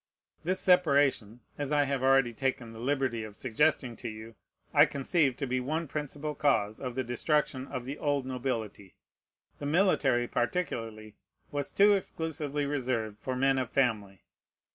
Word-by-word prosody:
This 185 +3 0
separation, 140 - +3 0.2
as 145 0 -2
I 145 -1 +4
have 140 -2 -1
already 135 -2 +4
taken 125 -2 -2
the 110 - -10
liberty 130 -3 -1
of 105 -1 -9
suggesting 130 +1 +1
to 120 - -5
you, 110 +1 -9 0.4
I - - +7
conceive 140 -1 +1
to 140 - -2
be 130 0 -1
one 155 +6 -2
principal 150 +1 -4
cause 110 -9 +1
of 125 -3 -5
the 130 - -1
destruction 130 +2 0
of 125 -1 -5
the 140 +3 -6
old 145 -3 0
nobility. 120 -7 -4 0.6
The 145 - -4
military, 145 -8 +2
particularly, 115 - -3 0.3
was 145 -1 -2
too 205 +1 +5
exclusively 155 -6 -2
reserved 125 -7 -2
for 130 +3 -3
men 135 +1 +2
of 130 - -2
family. 105 -8 0
130 Hz, 155 wpm, -30 LUFS, 120-145 Hz, 0.6 s, I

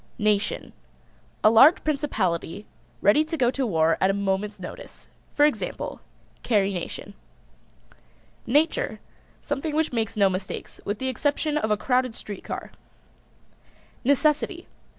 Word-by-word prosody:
NATION. 210 -2 0 0.7
A 215 - +7
large 270 +10 +7
principality 210 - -1 0.4
ready 210 +10 +5
to 320 +1 -4
go 245 -3 +3
to 265 -1 -1
war 165 -4 +2
at 190 - +4
a - - +2
moment's 200 +1 -1
notice. - - -9 0.3
For 295 - +6
example: 300 - -2 0.4
Carrie 200 -4 +2
Nation. 185 +3 -6 1.3
NATURE. 315 - +1 0.4
Something 290 +2 -3
which 315 -3 +1
makes 225 -2 -1
no 200 -1 +5
mistakes, 190 0 -5
with 205 +1 -2
the 260 - -3
exception 290 +4 0
of 220 -8 0
a 210 - +2
crowded 250 +1 0
street 205 -2 -8
car. - - -6 1.3
NECESSITY. 300 +6 +1
230 Hz, 130 wpm, -25 LUFS, 200-295 Hz, 1.3 s, A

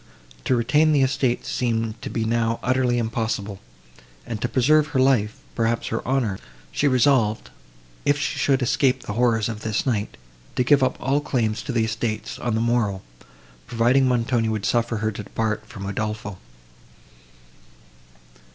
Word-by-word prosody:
To - - +2
retain 150 +7 +3
the 140 -2 +4
estates 130 -2 0
seemed 115 -2 -1
to - - -5
be 115 -2 -2
now 115 0 0
utterly 125 -1 +1
impossible, 110 -3 -2 0.7
and 115 -2 -5
to 120 - -1
preserve 150 +4 +3
her 145 -3 -1
life, 125 -5 +2 0.2
perhaps 115 0 0
her 115 - -2
honour, 125 -7 0 0.3
she 145 - +1
resolved, 125 -4 +2 0.5
if 145 - +2
she 145 - -2
should 135 -2 +2
escape 130 +1 +1
the 105 - -5
horrors 115 -2 +2
of 110 -2 -5
this 110 -2 -1
night, 110 - -1 0.4
to 125 - +2
give 140 +2 +4
up 130 - +1
all 140 +2 +1
claims 115 -6 -1
to - - -5
the 115 -2 +1
estates, 110 -1 -3
on 120 -2 -1
the 110 - 0
morrow, 115 -5 0 0.6
provided 120 +3 +3
Montoni 120 -2 +1
would 110 -2 -2
suffer 115 +2 +1
her 110 +1 -1
to 105 - -6
depart 110 +1 -3
from 100 -3 -8
Udolpho. 105 -1 -4
115 Hz, 160 wpm, -23 LUFS, 110-130 Hz, 0.7 s, the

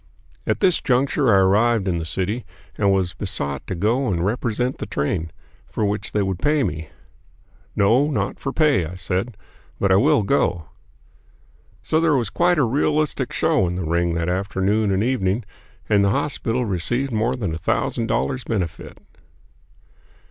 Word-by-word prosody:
At - - 0
this 185 -4 +4
juncture 130 0 +2
I 100 - +6
arrived 105 +2 +3
in 90 -2 0
the 80 - -3
city, 95 +8 -2 0.3
and 100 - +2
was 95 -2 +1
besought 70 -1 -4
to - - -3
go 115 +9 +1
and 90 -3 0
represent 120 +3 -1
the - - -5
train, 80 +2 -2 0.4
for 110 - -2
which 105 +1 -2
they 105 - +1
would 95 -2 -2
pay 150 -1 +2
me. 80 -8 -4 0.9
"No, 120 +9 +3
not 145 - -2
for 135 - -3
pay," 150 - +3
I 90 - -8
said, 95 +4 -3 0.4
"but 100 - +2
I 95 - +6
will 105 +1 +3
go." 100 - 0 1.1
So 155 - +1
there 165 -2 +3
was 120 -7 -1
quite 175 0 +2
a 145 - +4
realistic 150 +5 0
show 95 - +2
in 90 - -3
the 90 -2 -3
ring 85 +1 0
that 85 0 -1
afternoon 100 +3 0
and 95 +2 +1
evening, 115 -3 0 0.4
and 100 -1 +3
the 100 - +3
hospital 125 +1 -1
received 120 +8 -2
more 115 +3 0
than 100 -10 -3
a 80 - -4
thousand 115 +7 -1
dollars' 125 +2 -1
benefit. 90 -7 -4
105 Hz, 170 wpm, -22 LUFS, 95-125 Hz, 1.1 s, I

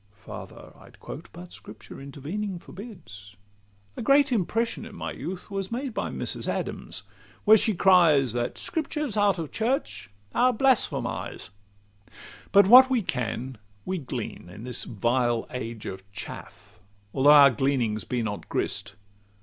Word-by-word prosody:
Farther 110 - -10
I'd - - -17
quote, - - -9
but 90 0 -11
Scripture 105 +5 -12
intervening 165 +9 -5
Forbids. 160 - -11 0.6
A - - -5
great 280 +3 +4
impression 230 +2 0
in - - -10
my - - -5
youth 185 +2 -7
Was 195 0 -3
made 250 +1 -3
by - - -2
Mrs. - - -3
Adams, - - -4 0.4
where 215 +1 +8
she 220 -1 +2
cries, 165 - +5
"That 120 0 -2
Scriptures 300 -6 -2
out 205 -2 +3
of 160 -3 -5
church 250 - -2 0.2
are 250 +1 +3
blasphemies." 250 - 0
XCVII 100 -1 -31 0.4
But 200 0 +7
what 255 +6 +9
we 250 -5 +1
can 125 -3 -3 0.3
we 185 -1 -2
glean 125 - -6
in 95 +5 -10
this 125 -1 0
vile 120 +2 0
age 115 -3 -6
Of 95 +1 -8
chaff, - - -10 0.3
although 140 +2 +4
our 145 -2 +9
gleanings 120 -4 0
be 120 -2 -2
not 105 -2 -5
grist. 95 - -2
140 Hz, 145 wpm, -26 LUFS, -, 0.6 s, what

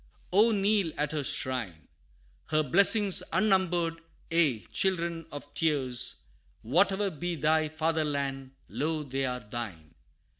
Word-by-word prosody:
Oh 215 +4 +5
kneel 200 -4 +2
at 150 0 0
her 150 -2 -2
shrine! 115 - -2 0.6
Her 155 0 +2
blessings 200 - +4
unnumbered 175 -5 +1 0.3
ye 145 - +2
children 170 -3 -1
of 145 0 -9
tears, 135 -6 0 0.4
Whatever 195 - +2
be 175 +2 -4
thy 155 +1 +1
Fatherland 145 -4 -2
lo 155 +1 -2
they 135 -1 -2
are 125 0 -4
thine! 105 -8 -7
155 Hz, 115 wpm, -29 LUFS, 135-175 Hz, 0.6 s, Oh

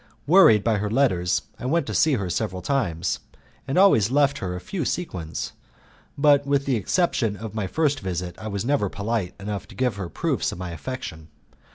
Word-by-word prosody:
Worried 145 - +6
by 115 -2 +2
her 105 +1 -2
letters 105 -8 +2 0.2
I 125 - -4
went 165 +5 +1
to - - -4
see 160 -2 +3
her 100 -7 -1
several 90 +1 -2
times, 95 - -1 0.5
and 135 - -1
always 180 - +5
left 140 +1 +2
her 90 -1 -3
a - - -4
few 175 - -4
sequins, 90 - -3 0.7
but 145 -1 +5
with 140 -1 +1
the 135 - +1
exception 115 - 0
of 110 -2 -7
my 105 -3 -2
first 150 +3 +1
visit 90 -2 -4
I 110 - -6
was 100 +1 -3
never 135 -7 +1
polite 100 -2 -2
enough 100 0 -5
to - - -14
give 125 -5 0
her 100 - -3
any 85 - -9
proofs - - 0
of - - -7
my 90 -1 -5
affection. 80 - -6
110 Hz, 200 wpm, -24 LUFS, 95-140 Hz, 0.7 s, Worried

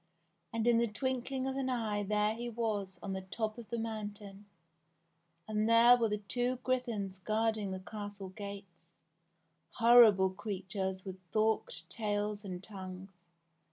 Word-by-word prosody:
And 230 -1 -1
in 240 -1 +5
the 235 - +2
twinkling 260 +3 -2
of 265 0 -2
an 265 -1 -1
eye 220 -4 0
there 210 +1 +1
he 240 +2 -5
was 210 -5 -2
on 195 - -3
the 190 - -3
top 215 +4 -3
of 225 -3 -10
the 235 - -2
moun 220 -2 -3
tain! 200 0 -12 1.0
And 215 +1 0
there 235 +2 +8
were 230 -2 +1
the 210 - 0
two 245 +5 -1
griffins 230 -7 -1
guarding 215 +1 0
the 190 0 -4
castle 205 -1 -7
gates 195 -3 -9 0.4
— 165 0 -45
horrible 230 -5 +7
creatures 190 -1 -4
with 190 -1 -6
forked 215 -6 0
tails 205 +1 -2
and 185 -2 -6
tongues. 190 -2 -8
210 Hz, 155 wpm, -33 LUFS, 195-230 Hz, 1.0 s, there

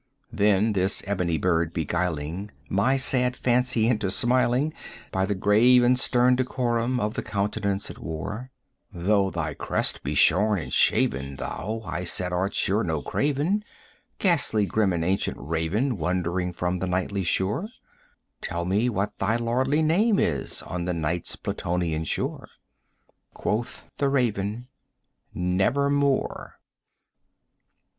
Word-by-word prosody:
Then 105 0 +2
this 95 0 0
ebony 90 -4 0
bird 85 0 +1
beguiling 85 +3 -2 0.2
my 105 +8 +2
sad 125 -1 +2
fancy 125 -2 +1
into 110 -5 +1
smiling 125 +7 +2 0.4
By 95 0 0
the 100 - -1
grave 115 +6 +5
and 125 +1 +4
stern 125 0 +3
decorum 125 -1 0
of 105 -1 -1
the - - -3
countenance 100 0 -2
it - - -12
wore, 80 - -5 0.4
"Though 95 +3 +1
thy 75 -5 -3
crest - - -1
be 70 +3 -3
shorn 105 +8 +4
and 85 - -5
shaven, 70 +1 +2
thou," 110 +10 -5
I 85 0 -4
said, 90 +1 -1
"art 95 +3 -1
sure 105 +4 +2
no 80 -4 -2
craven, 150 +9 0 0.5
45 - - -44
Ghastly 145 - +2
grim 105 -1 +1
and 85 -2 -1
ancient 95 +2 0
Raven 85 - -1
wandering 90 +1 -1
from 90 +1 -2
the 95 - -2
Nightly 95 +2 -1
shore: 95 - 0 0.7
Tell 85 0 -3
me 105 +7 +1
what 105 -2 -2
thy 105 +3 +1
lordly 130 +6 +1
name 200 +7 +3
is 70 -5 -1
on 90 -1 -4
the 90 -1 -1
Night's 85 +1 -2
Plutonian 85 -2 -2
shore!" - - -3 0.9
Quoth 115 +3 -2
the 140 - +1
Raven, 120 -3 -1 0.7
"Nevermore." 140 +10 0
100 Hz, 135 wpm, -25 LUFS, 90-125 Hz, 0.9 s, grave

